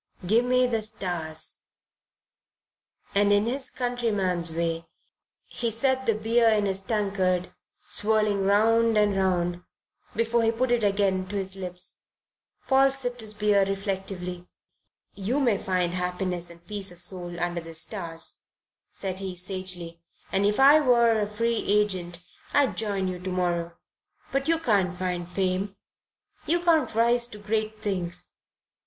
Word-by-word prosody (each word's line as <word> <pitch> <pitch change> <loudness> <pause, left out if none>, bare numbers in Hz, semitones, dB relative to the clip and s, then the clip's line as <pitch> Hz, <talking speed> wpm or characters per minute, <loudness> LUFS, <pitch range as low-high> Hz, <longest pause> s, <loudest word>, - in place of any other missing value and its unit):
Gimme 245 +5 +3
the 230 -3 0
stars." 175 -7 -3 1.5
And 205 0 +3
in 205 +1 +4
his 260 +3 -1
countryman's 205 -9 -1
way 165 0 -2 0.6
he 235 - -3
set 260 +3 0
the 225 - +3
beer 225 +2 +3
in 210 -2 +2
his 195 -1 0
tankard 195 -4 0 0.3
swirling 210 -2 +1
round 225 +3 +3
and 205 -1 +3
round 175 -2 0 0.5
before 230 +1 +1
he 225 0 +3
put 240 +2 -1
it 240 -2 +2
again 195 -2 +1
to 205 - -6
his 195 -1 -1
lips. 180 -1 -3 0.6
Paul 270 0 +5
sipped 245 -3 -2
his 215 -1 -7
beer 205 -1 +3
reflectively. 190 -2 -3 0.7
"You 215 +8 -1
may 235 -8 +2
find 180 -2 0
happiness 180 -1 -2
and 170 0 -15
peace 200 -3 0
of 175 - -12
soul 175 -1 -2
under 175 0 -1
the 165 0 -10
stars," 165 -1 -1 0.5
said 190 -1 -3
he, 190 -2 -5
sagely, 180 -2 -3 0.3
"and 195 +1 +2
if 210 +3 0
I 285 +3 +8
were 235 -5 +4
a 205 - 0
free 230 +2 -1
agent 190 -5 0 0.3
I'd 285 -2 +3
join 200 -3 -1
you 180 -1 -4
tomorrow. 175 -2 -2 0.5
But 275 +1 -1
you 330 0 +3
can't 200 - +1
find 180 -1 -3
fame. 190 +1 -1 0.7
You 345 +2 +2
can't 330 -8 +2
rise 235 +1 +3
to 210 - -10
great 215 +1 -2
things. 180 -4 -4
200 Hz, 140 wpm, -26 LUFS, 180-225 Hz, 1.5 s, I